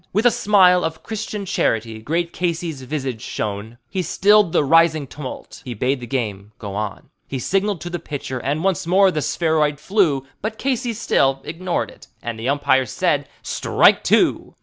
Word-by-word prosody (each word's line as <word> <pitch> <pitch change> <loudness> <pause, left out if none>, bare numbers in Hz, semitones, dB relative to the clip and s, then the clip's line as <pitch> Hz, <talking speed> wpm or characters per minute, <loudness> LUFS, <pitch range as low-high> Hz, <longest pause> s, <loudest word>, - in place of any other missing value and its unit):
With 210 +5 +1
a 245 - +7
smile 185 -5 +4
of 160 0 -4
Christian 215 -2 -5
charity 115 - -1
great 165 +8 -2
Casey's 170 -4 -2
visage 130 -4 -4
shone; 110 +2 -4
He 190 0 -2
stilled 205 0 +4
the - - +3
rising 160 0 +4
tumult; 135 0 -9
he 125 -2 -6
bade 130 +5 0
the 120 - -8
game 105 -5 -3
go 105 -5 -7
on; 105 0 -5 0.2
He 135 - -4
signaled 195 +6 0
to 175 - -5
the 175 - -3
pitcher, 140 -4 -5
and 145 +6 -2
once 190 -4 0
more 190 +2 +5
the 155 - -2
spheroid 155 -3 +1
flew; 155 -7 +1 0.2
But 220 +1 -3
Casey 255 -3 -1
still 135 -10 +1
ignored 175 +3 -3
it, - - -17 0.2
and 115 -1 -4
the 120 +4 -2
umpire 135 -2 +2
said, - - 0
"Strike - - +3
two." - - +2
155 Hz, 175 wpm, -21 LUFS, 130-185 Hz, 0.2 s, a